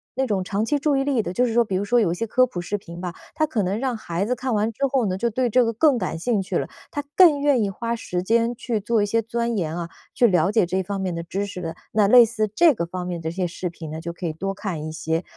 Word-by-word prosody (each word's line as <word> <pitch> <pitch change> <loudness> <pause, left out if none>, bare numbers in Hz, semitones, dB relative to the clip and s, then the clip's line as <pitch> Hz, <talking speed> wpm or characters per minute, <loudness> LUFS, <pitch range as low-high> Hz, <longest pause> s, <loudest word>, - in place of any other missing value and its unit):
那 265 - +1
种 195 -4 0
长 205 +4 -1
期 290 +4 +1
注 290 0 +1
意 270 - +1
力 270 -5 +1
的， 175 - -4
就 250 - +2
是 230 - -1
说 235 - +4
比 195 - -3
如 190 - 0
说 240 +4 +3
有 185 -7 +2
一 - - -1
些 230 - -2
科 255 +4 +4
普 185 -8 -6
视 205 +4 -2
频 170 -3 -10
吧， 180 -2 -4 0.2
它 310 - +2
可 235 -9 -1
能 190 +4 -1
让 260 -1 -1
孩 175 -2 -3
子 250 +4 0
看 255 -1 -2
完 215 +2 +1
之 275 +5 -1
后 260 -4 +1
呢， 185 -1 -1
就 235 +5 0
对 245 +2 0
这 250 +3 +4
个 230 - -1
更 275 +3 +3
感 185 -6 -3
兴 215 +3 0
趣 190 -2 -2
了， - - -2 0.2
他 290 - -3
更 330 -6 +7
愿 280 -5 +3
意 200 - 0
花 230 +4 -3
时 180 -6 -3
间 230 +4 +2
去 230 -2 -2
做 225 +1 +1
一 - - +2
些 225 +2 +1
钻 235 +1 -2
研 165 -4 -2
啊， 170 -1 -4 0.2
去 240 - +4
了 180 -2 +3
解 215 -4 +3
这 185 +2 -1
方 200 +1 -4
面 185 -2 -2
的 170 - -4
知 195 +4 -3
识 195 -3 -7
的。 165 -1 -5 0.2
那 210 -2 +4
类 245 +3 +9
似 215 -2 -1
这 330 +6 +5
个 170 -8 -2
方 180 +1 -5
面 175 -2 -4
的 160 - -3
一 - - -4
些 180 0 -1
视 175 +1 -4
频 165 -2 -9
呢， 160 - -5
就 170 +1 -4
可 175 - -7
以 160 - -1
多 195 +4 -3
看 190 -6 -5
一 - - -5
些， 160 +2 -2
205 Hz, 335 characters per minute, -23 LUFS, 180-235 Hz, 0.2 s, 类